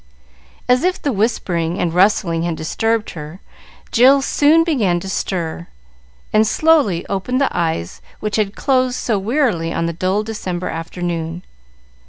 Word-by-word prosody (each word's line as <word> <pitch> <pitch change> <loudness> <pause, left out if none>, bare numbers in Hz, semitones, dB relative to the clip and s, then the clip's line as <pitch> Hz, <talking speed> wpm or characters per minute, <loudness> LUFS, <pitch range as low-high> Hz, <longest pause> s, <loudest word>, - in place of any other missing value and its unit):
As 250 +3 +3
if 365 +1 +1
the 285 - -1
whispering 180 -6 -1
and 170 -2 -1
rustling 180 -3 +2
had 170 -1 -1
disturbed 225 +8 -1
her, 155 +2 -9 0.5
Jill 265 +3 +5
soon 305 +4 +4
began 220 - +1
to 195 - -8
stir, 170 -3 -3 0.7
and 215 0 +4
slowly 290 - +2
opened 200 +6 -2
the 275 - 0
eyes 85 - -2 0.2
which 210 0 -2
had 205 -2 -1
closed 255 -2 +1
so 220 -5 -1
wearily 210 - 0
on 165 - -1
the 170 - -2
dull 185 +5 0
December 185 -5 -4
afternoon. 170 0 -4
195 Hz, 145 wpm, -18 LUFS, 170-250 Hz, 0.7 s, Jill